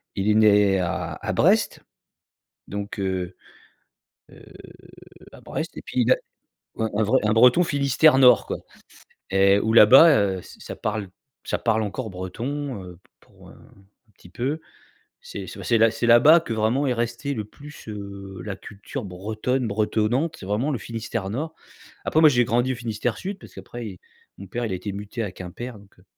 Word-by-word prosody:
Il 100 +2 0
est - - +5
né 105 -3 +4
à 85 -2 -3
à - - -2
Brest, - - +2 0.8
donc 100 0 -6
heu 95 -2 -3 1.0
heu, - - -16 0.9
à - - -14
Brest - - -5
et - - -7
puis 125 - -2
il 120 +2 +4
a - - +4 0.6
un 110 - 0
un 110 - +2
vrai 125 +6 +2
un 105 - +2
breton 125 +9 +6
Finistère 140 -1 +3
nord 125 -3 +6
quoi - - -4 0.7
et 100 +1 +4
où 110 - 0
là 115 -2 +8
bas, 135 +9 +8
heu, 100 - +2
ça - - -15
ça - - -8
parle 105 -2 -3 0.4
ça - - -2
parle 110 -1 +1
encore 110 +3 -4
breton, 120 +7 -5
heu, 90 -1 -11 0.2
pour, - - -19
heu, - - -13
un 100 +3 -23
petit - - -17
peu. 135 - -3 0.6
C'est 485 0 -8
c'est 115 - -1
bah, 115 +1 +5
c'est 115 +2 -2
là-bas 130 +8 +7
que 120 -8 -5
vraiment 110 +6 +1
est 125 - +1
restée 120 +4 -3
le 110 -4 -4
plus, 145 +8 -13
heu, 100 -2 -8
la 100 -2 -5
culture 105 +6 -8
bretonne 110 +7 -2
bretonnante. 110 +8 0
C'est 95 - -9
vraiment 110 +9 -1
le 130 - -2
Finistère 110 -3 -5
nord. 155 +9 -4 0.5
Après 160 - +2
moi 160 - +8
j'ai 120 -3 +3
grandi 120 +3 +1
au - - -5
Finistère 115 -1 -3
sud 195 +1 -5
parce - - -15
qu'après 120 -1 -8
i 95 -4 -9 0.4
mon 100 - -9
père 120 +6 -4
il 105 - -4
a - - -1
été 100 +3 -6
muté 105 +4 -5
à 105 - -3
Quimper 105 +7 -8
donc 100 -2 -21
heu, 90 - -22
110 Hz, 190 wpm, -24 LUFS, 100-125 Hz, 1.0 s, là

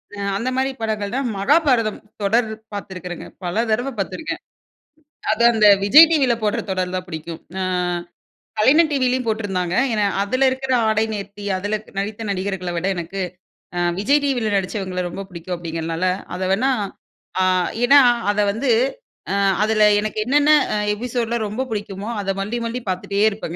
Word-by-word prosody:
அ - - -11 0.2
அந்த 235 +5 -2
மாரி 265 +1 +1
படங்கள் 215 -2 -2
தான் 270 0 -1
மகாபாரதம் 250 -1 +2 0.2
தொடர் 220 +3 +2 0.3
பார்த்துருக்கறங்க, 180 -3 -6 0.2
பல 175 0 -3 0.2
தடவ 245 +5 0
பார்த்துருக்கேன். 210 +10 -4 0.9
அது, 220 +2 0
அந்த 215 -2 +4 0.2
விஜய் 300 +11 +9
டிவியில 275 -7 +3
போடுற 210 -1 0
தொடர் 185 -1 -1
தான் 185 0 -4
பிடிக்கும். 160 0 -7 0.2
அ - - 0 1.0
கலைஞர் 305 +9 +5
டிவிலயும் 255 -2 +1
போட்டிருந்தாங்க. 195 -5 -1 0.2
ஏன்னா 210 -2 +1 0.2
அதில 255 +7 +1
இருக்கிற 265 0 -3 0.2
ஆடை 220 0 +2
நேர்த்தி, 205 0 -7
அதில 205 +3 -2
க் - - -18
நடித்த 205 +2 -4
நடிகர்கள 190 -1 -3
விட, 170 - -2
எனக்கு 175 +3 -5 0.6
அ - - +1 0.2
விஜய் 280 +9 +3
டிவியில 245 -7 0
நடிச்சவங்கள 190 -1 -3
ரொம்ப 195 +3 -6
புடிக்கும் 180 0 -5
அப்படிங்கிறனால, 165 +1 -3 0.3
அத 180 - -6
வேன்னா 250 +7 +1 0.7
அ - - +4 0.4
ஏன்னா, 280 +3 +7 0.3
அத 205 - -2
வந்து 240 +6 -2 0.6
அ - - +1 0.3
அதில 215 0 +3 0.2
எனக்கு 215 +1 -4
என்னென்ன 290 +4 +4 0.2
அ - - +1 0.2
எபிசோடுலா 235 +1 -2
ரொம்ப 225 +6 -3
பிடிக்குமோ, 205 -1 -4
அத 195 - -4
மறுபடி, 210 +5 -2
மறுபடி 235 +2 -3
பார்த்துட்டே 200 +3 0
இருப்பங்க. 200 -5 -6
210 Hz, 155 wpm, -21 LUFS, 190-245 Hz, 1.0 s, விஜய்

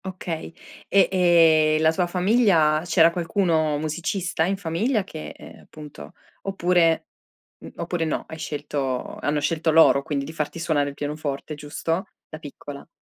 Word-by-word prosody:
Okay. 180 -4 -5 0.4
E, 200 - +4
ehm, 165 -4 +4
la 160 0 +4
tua 175 +1 0
famiglia 180 -5 +3
c'era 165 -1 +4
qualcuno 165 -3 0
musicista 165 +3 -2
in 195 +2 -1
famiglia 200 +6 -1
che, 160 -4 -8
ehm, - - -13
appunto 150 - -12 0.3
oppure 175 -4 +1 0.5
mhmm, - - -12
oppure 170 -1 -2
no, 155 - -2
hai 160 - -9
scelto 145 -4 -4
hanno 150 +2 -1
scelto 160 +1 0
loro 155 -3 +5
quindi 140 -1 -2
di - - -8
farti 155 +1 -4
suonare 145 -3 0
il - - -9
pianoforte, 145 0 -5
giusto? 160 +4 -3 0.2
Da 155 - -8
piccola. 145 -1 -10
160 Hz, 145 wpm, -23 LUFS, 150-175 Hz, 0.5 s, loro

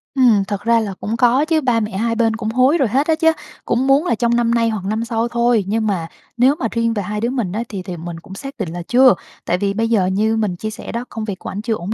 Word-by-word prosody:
Ừm, 235 -7 +4
thật 205 -1 -3
ra 230 0 +3
là 205 -3 -3
cũng 225 +2 -3
có 250 +5 +3
chứ, 320 -1 +1
ba 245 -4 +2
mẹ 210 -3 -3
hai 230 +1 0
bên 225 -1 +1
cũng 220 -1 -3
hối 255 +7 +3
rồi 270 -6 +2
hết 270 +8 +1
á 320 - +3
chứ, 325 0 +4 0.3
cũng 250 +3 0
muốn 280 +5 +4
là 235 - +1
trong 235 +2 +1
năm 235 -1 +2
nay 230 -1 +2
hoặc 205 -4 -4
năm 220 +3 -1
sau 230 0 -1
thôi. 235 -3 +2
Nhưng 220 +1 0
mà 175 -5 -1 0.3
nếu 260 +4 +4
mà 230 - 0
riêng 230 -1 0
về 205 -3 -2
hai 210 +3 -4
đứa 235 - 0
mình 235 -9 -2
á, 225 +4 -2
thì 195 -3 -5
thì 180 -3 -6
mình 165 0 -7
cũng 190 - -13
xác 275 +5 -8
định 185 -6 -2
là 175 - -5
chưa, 255 -1 +6 0.3
tại 175 - +1
vì 200 +1 -1
bây 225 +2 -1
giờ 205 -5 +3
như 215 +4 +1
mình 205 -5 -1
chia 215 +5 -4
sẻ 215 - -8
đó, 235 +2 -4
công 220 -1 -5
việc 195 -3 -5
của - - -7
ảnh 205 - -5
chưa 225 0 -1
ổn 200 +2 -4
225 Hz, 300 wpm, -19 LUFS, 205-240 Hz, 0.3 s, chưa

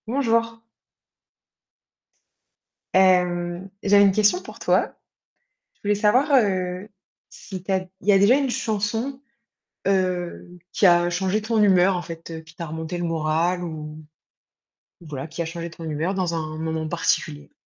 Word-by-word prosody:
Bonjour. 230 -2 0 2.3
Hem, 180 -1 +2
j'avais 200 0 +6
une 200 - +5
question 215 - +3
pour - - -12
toi. - - +1 0.8
Je - - -40
voulais 205 0 +1
savoir, 230 +8 +2
heu, 185 -3 0 0.4
si 190 -3 -9
tu 195 - -2
as 190 - +3 0.2
il 200 - -10
y - - +7
a 195 - +6
déjà 205 +7 +5
une 275 -2 0
chanson, 225 +4 -2 0.7
heu, 185 -3 -1 0.2
qui 200 - +3
a 175 -1 +4
changé 190 +4 -1
ton 220 0 0
humeur 190 -2 +4
en 175 - -3
fait, 165 0 -9
heu, 160 -1 -6
qui 160 +1 -17
t'a 170 -1 -6
remonté 160 +2 -5
le 175 - -3
moral 165 +2 0
ou 155 -1 -7 1.0
voilà, 150 -4 -7
qui 170 - -6
a - - -1
changé 170 +1 -6
ton 170 0 -11
humeur 160 +4 -2
dans 180 -3 -1
un 155 -1 -4
moment 160 0 -3
particulier? 75 - -1
180 Hz, 155 wpm, -23 LUFS, 165-205 Hz, 2.3 s, y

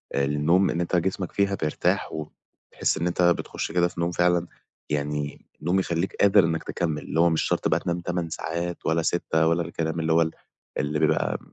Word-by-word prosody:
للنوم 75 +7 +2
إن 85 - -1
أنت 85 +1 -1
جسمك 90 +1 -1
فيها 100 0 +1
بيرتاح 75 -5 0
وبتحس 75 -1 -4
إن 85 +2 0
أنت 90 +1 -1
بتخش 85 -1 0
كده 85 +1 +3
في 85 - -10
نوم 85 +1 0
فعلًا 90 0 +2 0.4
يعني 75 0 -3 0.2
نوم 90 +5 +2
يخلّيك 85 0 -1
قادر 100 -1 +5
إنك 80 -1 -1
تكمل 80 -4 -2
اللي - - -2
هو 85 +1 +6
مش 80 - +1
شرط - - 0
بقى - - +2
تنام 85 0 -2
8 90 -1 -2
ساعات 85 +2 -4
ولا 80 +1 +2
6 80 -1 +1
ولا 85 +1 +2
الكلام 80 0 -3
اللي 80 0 +1
هو 85 - +5
ال 80 -1 +1 0.5
اللي 75 +1 -1
بيبقى 80 - +1
85 Hz, 195 wpm, -25 LUFS, 80-90 Hz, 0.5 s, هو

